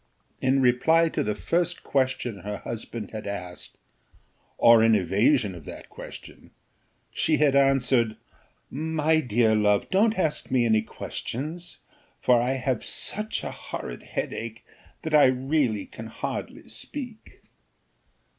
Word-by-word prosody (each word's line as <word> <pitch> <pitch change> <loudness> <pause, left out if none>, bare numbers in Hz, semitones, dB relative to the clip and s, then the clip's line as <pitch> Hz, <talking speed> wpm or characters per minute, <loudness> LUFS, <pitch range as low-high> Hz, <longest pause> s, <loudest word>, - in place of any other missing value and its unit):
In 130 +1 +3
reply 160 +7 +4
to - - -2
the 105 0 -1
first 175 +1 -1
question 130 -5 -1
her 105 +3 -5
husband 115 -1 -6
had 105 -2 -6
asked, 90 -3 -7 0.8
or 115 -1 +7
in 115 -1 +5
evasion 100 - +2
of 85 -4 -11
that - - -10
question, - - -11 0.6
she 155 - +1
had 145 -2 +3
answered, 130 -4 +3 0.5
"My 160 +2 +1
dear 115 -5 +2
love, 105 -1 +2
don't 215 +4 +3
ask 160 -5 -1
me 125 -2 +2
any 110 -1 +3
questions, 155 +9 -6 0.4
for 120 -2 +4
I 125 +2 +1
have 130 -3 -1
such 215 +1 -1
a - - -4
horrid - - -7
headache, 115 0 -5 0.4
that 160 - -4
I 150 -1 +7
really 130 -4 +1
can 115 - -9
hardly 115 - -6
speak." 245 -6 -9
125 Hz, 130 wpm, -26 LUFS, 110-155 Hz, 0.8 s, or